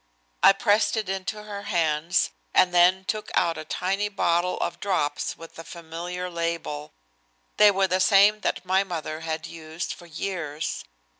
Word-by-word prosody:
I - - +8
pressed 210 +1 +2
it 215 -3 -2
into 195 +2 -4
her 205 -1 -7
hands, 170 - +1 0.2
and 180 -1 +5
then 180 +2 +4
took 215 +1 -3
out 170 -2 +2
a 155 - -6
tiny 195 +6 -1
bottle 180 -2 +1
of - - -3
drops 150 -7 -1
with 165 0 -12
a - - -7
familiar 170 +2 -6
label. 165 -3 -4 0.6
They 210 - +8
were 195 -1 +2
the 185 +1 +1
same 205 +2 +5
that 185 - -2
my 190 +1 +3
mother 160 -4 -5
had 160 -1 -4
used 160 +1 -6
for 175 - -14
years. 160 -3 -4
180 Hz, 160 wpm, -25 LUFS, 165-195 Hz, 0.6 s, I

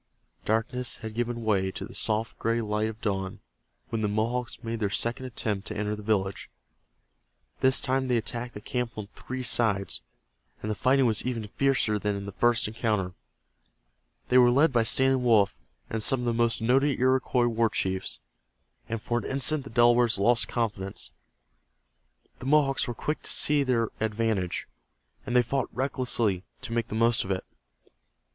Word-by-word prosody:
Darkness 125 +3 -1
had 110 - -5
given 120 0 -2
way 100 -3 +1
to - - -6
the - - -12
soft 110 +1 -1
gray 115 +1 +1
light 105 0 -1
of 110 0 -10
dawn 95 -3 -2 0.5
when 115 - -2
the 105 - +1
Mohawks 120 +4 -2
made 115 0 -3
their 105 -2 0
second 120 +5 -1
attempt 105 -5 -3
to 110 - -5
enter 105 +1 -1
the 105 - -9
village. 100 -2 -1 1.1
This 130 0 +4
time 130 0 0
they 125 -1 +2
attacked 120 +1 -4
the 105 - -7
camp 125 0 -3
on 105 -2 -6
three 130 0 -5
sides, 110 - 0 0.6
and 110 - -3
the - - +1
fighting 130 +5 +3
was 110 -3 +2
even 115 -4 -3
fiercer 130 -5 +1
than 105 0 -1
in 100 0 -5
the 100 - -6
first 120 +2 +2
encounter. 105 -4 -1 1.2
They 125 - +6
were 120 -1 +7
led 140 +4 +4
by 120 - +4
Standing 130 +3 +3
Wolf 110 - +4 0.3
and 110 - -3
some 130 +3 +2
of - - -3
the 120 - +1
most 115 -1 +1
noted 135 +4 +2
Iroquois 130 -1 +2
war 115 -1 +2
chiefs, 95 -2 -2 0.7
and 115 0 -2
for 120 +2 -1
an 105 - -8
instant 140 +1 +1
the - - -8
Delawares 120 -1 +4
lost 115 +4 +3
confidence. 105 -5 -3 1.3
The 125 - -6
Mohawks 140 -2 +3
were 120 - -4
quick 150 +6 -3
to - - -4
see 150 -1 +4
their 120 -4 +1
advantage, 110 -4 -1 0.6
and 120 - -2
they 125 - +6
fought 135 +2 -1
recklessly 120 -7 0 0.2
to 125 -3 -5
make 115 -1 0
the - - -5
most 115 0 +3
of 95 - -8
it. 95 -1 -1
115 Hz, 175 wpm, -27 LUFS, 105-125 Hz, 1.3 s, were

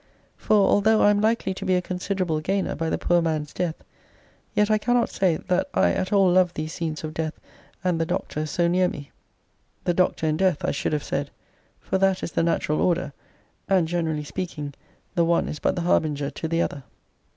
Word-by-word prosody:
For 215 - +1
although 215 +2 +4
I 205 - +6
am 205 0 +1
likely 220 -3 +1
to 190 - -7
be 185 -1 +2
a 180 - +2
considerable 180 -3 -2
gainer 190 +5 -1
by 165 0 -2
the - - 0
poor 175 0 +2
man's 155 -3 -2
death, 170 -3 -2 0.8
yet 210 +1 +3
I 215 - +3
cannot 245 +2 +1
say 180 -4 +1
that 185 +2 -1
I - - +4
at 185 0 -2
all 195 -2 +5
love 180 -1 +3
these 155 +1 -4
scenes 160 -2 -4
of 155 0 -5
death 160 0 -3 0.4
and 175 -3 +1
the - - +1
doctor 155 -4 -2
so 170 +3 +1
near 180 +1 +3
me. 140 -1 -9 0.7
The 175 - +1
doctor 180 -2 +1
and 155 0 0
death 185 -5 +1
I - - +1
should 145 - -2
have 150 - -1
said; 140 +1 -2 0.5
for 190 - -2
that 195 -1 +2
is - - -3
the - - +1
natural 165 -2 0
order, 175 -5 +1 0.6
and 185 -4 +3
generally 160 -3 -1
speaking, 150 -2 -5 0.4
the 170 -2 +2
one 170 0 +2
is 150 - -5
but - - +1
the 175 - -2
harbinger 145 -4 +1
to 160 - -5
the 165 +1 +1
other. 140 - -5
175 Hz, 205 wpm, -24 LUFS, 155-190 Hz, 0.8 s, I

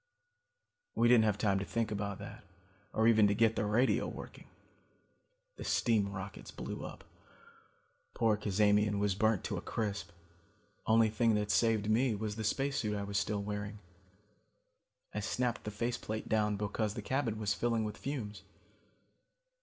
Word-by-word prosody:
"We 120 - +4
didn't 120 -2 +6
have 105 -2 +1
time 100 -2 +2
to - - -2
think 115 0 -1
about 100 -1 -3
that, - - -9 0.5
or 110 +1 +2
even 110 -2 +6
to 100 - +1
get 115 +1 +3
the 105 - 0
radio 120 +5 +2
working. - - -9 1.1
The - - -6
steam 105 -5 +2
rockets 95 0 -7
blew - - -6
up. - - -8 1.1
Poor 115 -2 +3
Cazamian 105 0 +2
was 100 -1 +1
burnt 110 0 +2
to - - -3
a - - -4
crisp. 100 -6 -3 0.8
Only 110 -1 +5
thing 115 0 +2
that 105 0 0
saved 110 -1 +2
me 115 +2 +2
was 105 0 -3
the 110 - -4
spacesuit 125 -3 0
I 100 - -3
was 100 0 -1
still 100 0 -1
wearing. 105 0 -4 1.4
I 105 - -2
snapped 115 +5 -1
the - - -2
face 115 +3 -2
plate 110 0 -5
down 105 -1 +1
because 105 +1 -2
the 105 - -5
cabin 125 -2 -1
was 105 -1 0
filling 115 0 0
with 105 -1 -4
fumes. 115 -8 -5
105 Hz, 160 wpm, -33 LUFS, 105-115 Hz, 1.4 s, didn't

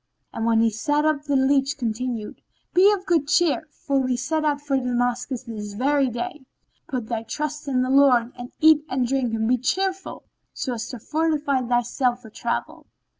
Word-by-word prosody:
And 225 - -2
when 225 -1 +4
he 225 0 +3
sat 290 +7 0
up 300 -2 +1
the 285 -1 0
leach 275 +1 +2
continued, 235 -2 -4 0.3
"Be 385 +3 +6
of 390 -2 -2
good 325 -5 +1
cheer 320 0 +2
for 280 -2 -1
we 255 -2 0
set 310 +5 -1
out 295 -2 +1
for 290 -1 -2
Damascus 245 0 -1
this 210 -4 -7
very 270 +4 +2
day: 300 +5 -5 0.4
put 255 -5 -3
thy 225 -1 -3
trust 300 +5 -5
in 255 -2 +1
the 255 - -2
Lord 255 -4 +4
and 245 0 -9
eat 310 -1 +6
and 255 -1 0
drink 260 -2 0
and 220 0 -1
be 250 +1 +2
cheerful 380 +8 -2 0.3
so 255 - -3
as 230 -1 -5
to 250 - -6
fortify 300 0 0
thyself 245 +1 0
for 220 - -12
travel." 235 +2 -4
260 Hz, 185 wpm, -23 LUFS, 240-295 Hz, 0.4 s, Be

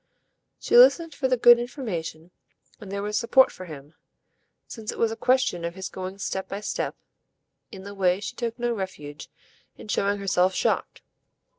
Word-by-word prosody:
She - - -1
listened 345 -10 +6
as - - -18
for 265 - +2
the 255 -1 +1
good 240 0 +7
information, 180 - -5 0.5
and 200 -3 -10
there 200 0 -3
was 210 0 -1
support 260 +3 +4
for 185 - -10
him 150 -2 -11 0.7
since 220 -3 -6
it - - -10
was 230 -1 +1
a - - -4
question 250 -8 +1
of 170 +1 -4
his 190 -1 -6
going 185 +1 -7
step 190 -1 -4
by 200 - -5
step - - -3 0.8
in 190 -3 -10
the 200 +1 -8
way 185 -2 +1
she 205 - -6
took 230 -2 -4
no 240 0 -1
refuge 155 - -7 0.5
in 215 - -12
showing 200 0 +1
herself 185 -1 +1
shocked. - - -1
200 Hz, 180 wpm, -25 LUFS, 185-240 Hz, 0.8 s, good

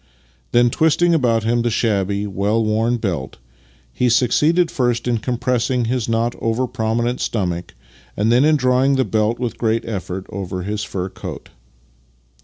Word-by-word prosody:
Then, 120 0 +4
twisting 160 +4 +3
about 120 -8 +2
him 120 +2 +1
the 120 - 0
shabby, 100 -3 0
well 105 +3 0
worn 110 +3 +1
belt, 90 - -3 0.6
he 125 - +1
succeeded 150 +9 +3
first 120 -2 0
in 120 -2 +1
compressing 125 0 0
his 120 -1 -1
not 115 +1 +1
over 115 +3 0
prominent 120 +1 -1
stomach, 90 -5 -2 0.4
and 110 +2 +2
then 125 +3 +5
in 155 +1 +4
drawing 130 0 +2
the 130 -1 +2
belt 110 +1 0
with 120 -3 -3
a - - -26
great 115 -1 0
effort 95 -4 -5
over 95 -1 -4
his 105 +2 -3
fur 95 -3 -4
coat. - - -8
115 Hz, 160 wpm, -20 LUFS, 105-125 Hz, 0.6 s, then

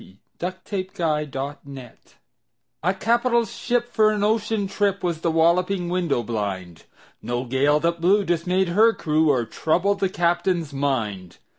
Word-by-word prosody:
Y - - -17
Z 95 - -20 0.2
A - - -1 0.3
Nautical 170 -5 -1
Ballad 135 -2 -7 0.9
A 180 - +2
CAPITAL 235 +3 +2
ship 240 +1 -2
for 215 -2 +4
an 210 -1 -1
ocean 215 -1 0
trip 200 0 -1
Was 170 -3 -2
The 170 - +1
Walloping 175 +3 +2
Window 175 -9 0
blind 95 -7 -4 0.4
No 120 +1 -2
gale 140 +4 +2
that 170 0 0
blew 195 +4 +3
dismayed 180 +2 0
her 220 +6 +4
crew 155 -3 +1
Or 125 -5 +2
troubled 180 - 0
the 195 - +1
captain's 175 -3 0
mind. 110 -11 -2
170 Hz, 150 wpm, -23 LUFS, 140-195 Hz, 0.9 s, for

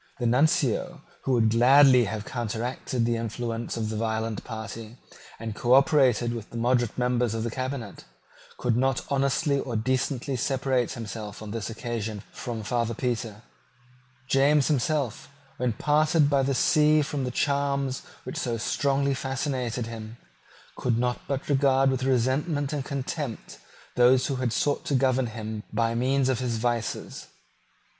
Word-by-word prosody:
The 125 - -3
Nuncio, 145 +5 +1 0.2
who 135 - +1
would 110 -3 +3
gladly 130 +1 +6
have 105 0 -4
counteracted 120 +1 -2
the 120 0 +1
influence 115 0 -4
of 110 -1 -2
the 110 - -3
violent 110 -1 -2
party, 110 +1 -7 0.4
and 115 -1 -4
cooperated 125 0 +3
with 115 -3 -7
the 115 - -7
moderate 120 -1 +1
members 125 -2 +1
of 110 - -2
the 115 - -2
cabinet, 130 -4 -5 0.5
could 120 -2 0
not 130 +1 +1
honestly 140 +1 +1
or 125 -3 -4
decently 130 +3 -1
separate 130 -1 0
himself 110 -2 -7
on 105 - -7
this 115 0 -4
occasion 110 -3 -4
from 115 -3 -5
Father 115 +1 -1
Petre. 115 -3 -3 0.8
James 140 +2 +3
himself, 145 -1 -1 0.3
when 125 -2 0
parted 150 +3 +2
by 140 -1 +4
the 135 0 0
sea 155 0 +4
from 140 -1 -3
the 125 - -1
charms 140 0 0 0.2
which 130 - -6
had - - -1
so 120 -2 -1
strongly 140 +4 +1
fascinated 130 -3 -2
him, 115 0 -8 0.6
could 120 -2 0
not 125 +1 0
but 140 -1 -3
regard 135 -1 +3
with 130 -1 -1
resentment 135 +4 +1
and 145 -2 -2
contempt 140 -2 -5 0.4
those 125 +1 +5
who 135 - -2
had 125 -2 -1
sought 145 +5 0
to 140 - -1
govern 130 -1 +2
him 110 -1 -5
by 115 +1 +1
means 130 +3 +1
of 130 -3 +1
his 120 -3 -1
vices. 120 -1 -3
125 Hz, 150 wpm, -26 LUFS, 115-135 Hz, 0.8 s, gladly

